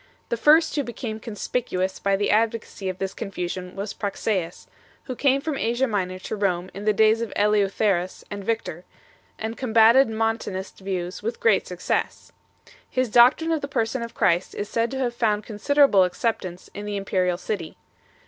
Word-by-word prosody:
The - - 0
first 305 +7 +4
who 290 - +1
became 235 -3 -5
conspicuous 205 -3 -3
by 200 0 +1
the 205 +1 0
advocacy 215 -3 0
of 185 - -5
this 190 0 -3
confusion 180 -2 -5
was 200 +1 -4
Praxeas, 195 -4 -3 0.4
who 255 - -5
came 275 +1 +2
from 300 -2 -3
Asia 240 +3 +1
Minor 190 -6 -2
to 185 - -5
Rome 185 -3 -1
in 200 +2 -7
the 215 - +4
days 220 +2 +3
of 230 - -3
Eleutherus 200 -3 +1
and 200 -1 -5
Victor, 195 -6 -3 0.5
and 220 +1 -4
combatted 235 +2 +5
Montanist 220 -3 -2
views 185 -2 -4
with 230 +3 -4
great 220 -4 +3
success. 180 -1 -3 0.6
His 255 -2 0
doctrine 255 +8 +5
of 320 -2 0
the 280 - -3
Person 235 -2 -1
of 235 0 -7
Christ 175 0 +1
is 205 - -3
said 230 +1 0
to 270 - -5
have 250 -2 -1
found 215 -3 0
considerable 225 0 +4
acceptance 185 -1 -2
in 205 +1 -6
the 205 -1 -2
im 195 - -5
perial 180 -2 +1
city. 180 -4 -5
210 Hz, 175 wpm, -24 LUFS, 190-235 Hz, 0.6 s, combatted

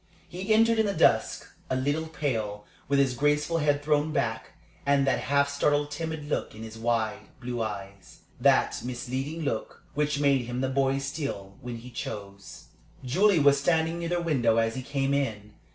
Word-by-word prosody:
He 190 +5 -4
entered 225 +1 +5
in 220 - +3
the 200 - -1
dusk; - - +3 0.2
a 130 - 0
little 145 +5 0
pale, 110 -10 -3 0.2
with 140 - +2
his 135 -2 +3
graceful 150 +5 +1
head 145 -1 +1
thrown 150 +1 +2
back, 110 -6 -2 0.3
and 140 -1 +3
that 135 - +2
half 140 +1 +2
startled, 145 +1 +1
timid 160 0 -4
look 145 - -2
in 110 - -8
his 110 0 -8
wide, 115 -1 -1
blue 120 -2 -4
eyes 100 -2 -6 0.2
that - - +3
misleading 130 +6 -4
look 115 -6 -3
which 150 0 0
made 140 -4 +3
him 125 +1 -3
the 130 - 0
boy 135 0 +1
still, 135 -8 -4
when 120 -2 -5
he 125 +2 -11
chose. 100 -4 -8 0.4
Julie 190 +9 +4
was 140 -2 +5
standing 160 +2 +1
near 170 -1 -3
the 175 0 0
window 120 -9 +2
as 115 0 +2
he 130 - -4
came 135 +1 -1
in. 110 -7 -2
140 Hz, 180 wpm, -27 LUFS, 120-150 Hz, 0.4 s, entered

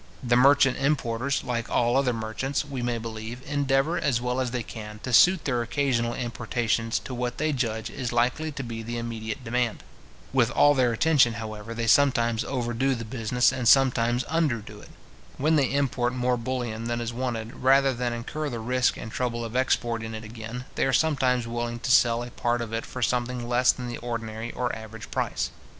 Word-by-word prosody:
The 120 -1 +2
merchant 135 +1 +5
importers, 140 -2 0
like 120 -2 -3
all 120 0 +2
other 135 -2 +3
merchants, 115 +6 -2
we 135 -3 -5
may 120 -1 -1
believe, 115 +2 -7
endeavour, 140 +3 +1
as 125 -4 +1
well 125 +1 -1
as 130 -1 0
they 120 -1 -3
can, 105 -1 -8
to 130 - -4
suit 175 - +6
their 125 -4 0
occasional 120 -1 0
importations 115 -1 -1
to 130 - -7
what 125 0 -3
they 155 0 0
judge 115 -4 -2
is 125 -4 -4
likely 125 +7 +1
to 140 - -5
be 115 -2 -5
the 120 +1 -5
immediate 115 +1 -5
demand. 120 0 -1 0.5
With - - +3
all 145 - +5
their 130 -3 +2
attention, 130 -1 +3
however, 110 0 -6
they 115 0 -2
sometimes 115 -2 +3
overdo 130 +1 -1
the 115 -1 -6
business, 115 +1 +1
and 125 -2 -2
sometimes 125 -2 +4
underdo 120 -10 -2
it. - - -14 0.5
When 155 +4 +2
they 140 -4 +2
import 130 -3 0
more 125 0 +1
bullion 120 -2 -3
than 120 0 -1
is 120 0 -3
wanted, 120 -2 -4
rather 135 +1 +4
than 120 0 -2
incur 145 +6 -4
the 120 - -4
risk 125 +3 +1
and 110 - -7
trouble 120 -1 -2
of 115 +1 -7
exporting 115 -3 0
it 110 - -7
again, 115 +2 -7
they - - +1
are 135 - 0
sometimes 130 -4 +2
willing 120 0 -3
to 125 +2 -2
sell 120 -1 +4
a 120 - -8
part 120 +1 -1
of 115 -1 -5
it 115 - -3
for 125 - -4
something 125 0 -1
less 125 +1 +4
than 125 -1 -6
the 120 - -5
ordinary 115 -1 -4
or 125 -1 -2
average 110 0 -10
price. - - -1
120 Hz, 195 wpm, -26 LUFS, 115-130 Hz, 0.5 s, suit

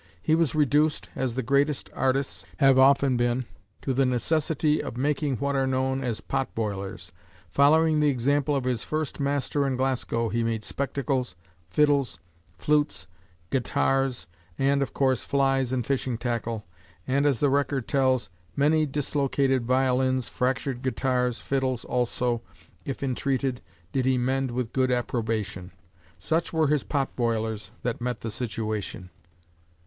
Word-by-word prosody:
He 130 - +1
was 160 -2 +2
reduced, 150 +1 +2
as 130 -3 -2
the 130 - -1
greatest 140 +3 +1
artists 135 +1 0
have 135 -2 +5
often 135 -1 +5
been, 120 +1 +1 0.4
to 135 - 0
the 135 +2 +3
necessity 150 +4 +1
of 120 - -6
making 145 0 0
what 140 +4 -1
are 135 -1 +2
known 130 +1 0
as 115 -3 -2
"pot 135 +3 -2
boilers." 100 -5 -4 0.4
Following 155 - +4
the 150 -1 +4
example 140 +3 +1
of 135 - 0
his 125 -3 -1
first 155 -2 -3
master 140 0 0
in 130 - 0
Glasgow 125 -3 0
he 115 +1 0
made 115 -1 -1
spectacles, 135 -5 -2 0.3
fiddles, 140 - +2 0.4
flutes, 150 - +1 0.5
guitars, 135 0 0 0.3
and, 140 +1 +2
of 140 - -1
course, 130 -2 +1
flies 135 -2 +1
and 125 -3 -1
fishing 130 -3 -1
tackle, 115 -2 -3 0.4
and, 140 +2 +2
as 135 -6 +2
the 145 - +3
record 140 -2 0
tells, 130 - +1 0.2
"many 155 +2 +3
dislocated 135 -2 0
violins, 130 0 +2
fractured 130 0 -1
guitars, 125 -2 0
fiddles 130 -3 -1
also, 120 -1 0 0.4
if 135 0 -4
intreated, 135 -1 -1 0.3
did 130 -1 0
he 130 -1 +3
mend 130 +2 0
with 120 -1 -3
good 130 -1 +2
approbation." 110 -6 -2 0.5
Such 160 - -1
were 160 -3 +2
his 150 -2 +2
"pot 140 -3 -2
boilers" 110 -3 -1
that 120 0 -2
met 125 0 -2
the 115 - -4
situation. 105 -5 -4
130 Hz, 145 wpm, -26 LUFS, 120-140 Hz, 0.5 s, have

